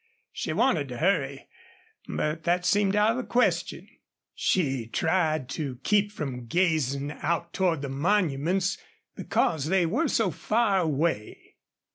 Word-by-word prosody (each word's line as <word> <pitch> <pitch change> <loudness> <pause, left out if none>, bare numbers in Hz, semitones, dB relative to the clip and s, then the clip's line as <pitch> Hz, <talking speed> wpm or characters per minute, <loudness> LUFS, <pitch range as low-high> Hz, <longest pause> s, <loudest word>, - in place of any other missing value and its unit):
She - - -4
wanted 160 - +1
to 125 -2 -7
hurry, 145 -6 0 0.6
but 155 +2 -2
that 175 +1 +1
seemed 200 +1 +2
out 210 +1 +4
of 230 - -2
the 255 - -2
question. 245 +1 0 0.5
She 135 -10 0
tried 155 0 0
to 140 -2 -4
keep 205 +2 +2
from 130 - -5
gazing 145 -4 0
out 170 +1 -1
toward 170 -6 0
the 140 - -3
monuments, 175 +3 0 0.4
because 155 -4 0
they 185 0 +2
were 245 - +1
so 220 -8 +1
far 215 +4 +1
away. 155 - -2
165 Hz, 135 wpm, -27 LUFS, 140-195 Hz, 0.6 s, out